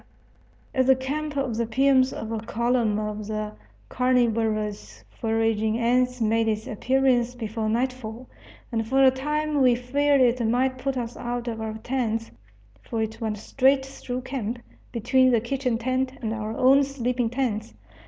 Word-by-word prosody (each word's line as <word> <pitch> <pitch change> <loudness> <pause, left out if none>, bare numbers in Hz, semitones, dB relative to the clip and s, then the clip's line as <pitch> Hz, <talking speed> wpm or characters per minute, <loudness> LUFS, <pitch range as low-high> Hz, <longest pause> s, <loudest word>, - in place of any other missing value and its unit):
At 260 -1 +2
the 265 - +7
camp 290 +3 -3
of 255 -5 -1
the 235 -1 0
piums 260 +2 +3
a 220 0 -5
column 235 -3 +1
of 210 -1 -4
the 215 0 -3 0.3
carnivorous 220 - 0
foraging 225 -1 0
ants 250 +1 +1
made 225 0 +2
its 215 0 -1
appearance 250 +1 +1
before 220 -2 -3
nightfall, 245 0 -2 0.4
and 225 -2 -1
for 270 +3 +3
a 260 - +7
time 300 +2 -1
we 250 -2 +5
feared 280 +3 +2
it 245 -1 +3
might 255 +3 +1
put 270 0 -2
us 240 -1 -4
out 240 0 -4
of 225 -1 -3
our 220 0 -4
tents, 225 -2 -2 0.5
for 220 - -2
it 220 +1 -6
went 215 -2 -2
straight 265 +5 +2
through 255 -2 -6
camp, 250 -3 -4 0.3
between 255 +3 +3
the 240 -2 +4
kitchen 250 0 -1
tent 255 +2 -1
and 220 0 -1
our 220 0 -4
own 270 +2 +5
sleeping 250 -3 -1
tents. 225 - -2
240 Hz, 155 wpm, -25 LUFS, 220-260 Hz, 0.5 s, the